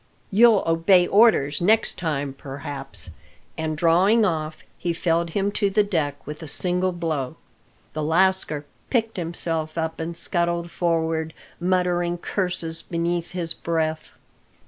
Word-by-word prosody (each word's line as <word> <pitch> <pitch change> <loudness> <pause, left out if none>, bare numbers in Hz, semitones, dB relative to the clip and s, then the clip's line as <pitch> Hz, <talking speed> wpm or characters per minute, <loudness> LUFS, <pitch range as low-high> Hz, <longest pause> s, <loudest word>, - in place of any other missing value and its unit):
You'll 220 0 +6
obey 165 +2 +4
orders 195 -9 +4
next 215 +5 +2
time, 145 -5 -2
perhaps;" 135 - -7 0.4
and 160 -1 -3
drawing 185 +7 +4
off, 155 -4 -2 0.2
he 170 -1 -1
felled 170 0 0
him 200 0 +1
to 205 -1 +1
the 210 +2 +3
deck 155 -8 -2
with 150 +2 -7
a 160 - -7
single 180 +4 0
blow. 160 -7 -3 0.6
The 155 - -3
lascar 160 -2 +2 0.2
picked 225 -4 0
himself 165 -2 -3
up 160 0 -2
and 165 +1 -4
scuttled 170 -1 0
forward, 160 -2 -1 0.2
muttering 175 -1 +1
curses 170 -3 -2
beneath 170 0 -2
his 170 -2 -1
breath. 160 -1 -2
170 Hz, 130 wpm, -23 LUFS, 160-180 Hz, 0.6 s, You'll